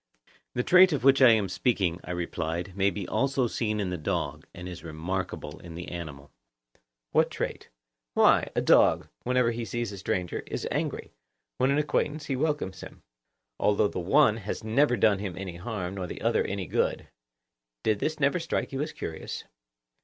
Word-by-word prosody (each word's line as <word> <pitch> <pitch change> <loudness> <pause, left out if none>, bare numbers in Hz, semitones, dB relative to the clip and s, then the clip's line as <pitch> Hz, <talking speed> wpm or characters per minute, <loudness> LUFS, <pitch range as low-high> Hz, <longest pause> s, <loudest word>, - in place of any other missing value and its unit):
The 125 - +1
trait 180 +2 +7
of 140 - -1
which 135 0 +5
I 130 - +9
am 110 -3 +4
speaking, 95 -3 0
I - - -11
replied, 85 0 -3
may 100 0 +3
be 95 -1 -5
also 135 +2 +1
seen 110 -2 -1
in 95 -3 -1
the 90 - -3
dog, 75 - -3
and 90 +1 -8
is 90 -2 -8
remarkable 85 -1 -4
in 85 -1 -10
the 85 +1 -6
animal. 75 -5 -7 0.8
What - - +3
trait? - - -4 0.5
Why, - - +5
a - - +2
dog, - - +4 0.2
whenever 125 -1 +2
he 120 0 -4
sees 120 -1 -3
a 100 - -8
stranger, 90 -2 -2
is - - -3
angry; - - -3 0.4
when 130 - +2
an 140 - +2
acquaintance, 150 0 0
he 135 - -1
welcomes 140 - -1
him, - - -11 0.6
although 105 0 +3
the - - -4
one 110 - +4
has 105 -1 -5
never 120 +3 +3
done 105 -4 +4
him 95 -4 -4
any 90 -3 -6
harm, 95 -1 -4
nor 95 -2 -4
the - - -7
other - - +2
any 100 -1 -3
good. - - -1 0.8
Did 110 -2 +1
this 155 +5 -2
never 140 +4 +2
strike 165 - -2
you 135 0 -2
as 150 - -3
curious? 80 - -6
100 Hz, 185 wpm, -28 LUFS, 90-130 Hz, 0.8 s, I